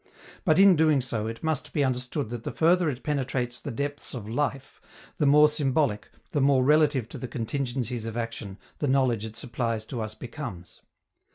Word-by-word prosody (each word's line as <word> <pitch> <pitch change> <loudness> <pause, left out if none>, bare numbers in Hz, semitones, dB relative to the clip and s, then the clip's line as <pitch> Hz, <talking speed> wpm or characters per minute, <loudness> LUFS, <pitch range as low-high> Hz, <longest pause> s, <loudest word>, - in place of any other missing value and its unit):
But, 155 -5 +3
in 195 -1 +7
doing 155 -2 +4
so, 115 -4 -2
it 115 +5 -6
must 160 -3 -2
be 150 - +2
understood 125 -1 -2
that 120 -2 -5
the - - -3
further 170 +1 +3
it 130 -2 -5
penetrates 130 -4 -1
the - - -6
depths 145 +3 -4
of 110 -4 -6
life, 135 +2 -3 0.4
the 150 - +2
more 150 +2 +7
symbolic, 140 -6 0 0.2
the 145 - +1
more 135 -1 +4
relative 150 -4 +3
to - - -8
the 130 - -5
contingencies 120 -1 -3
of 115 +1 -5
action, 115 -4 -5 0.2
the 145 - 0
knowledge 130 -5 +2
it 110 0 -8
supplies 115 -1 -2
to 120 0 -5
us 110 0 -5
becomes. 115 - -8
130 Hz, 185 wpm, -27 LUFS, 115-145 Hz, 0.4 s, in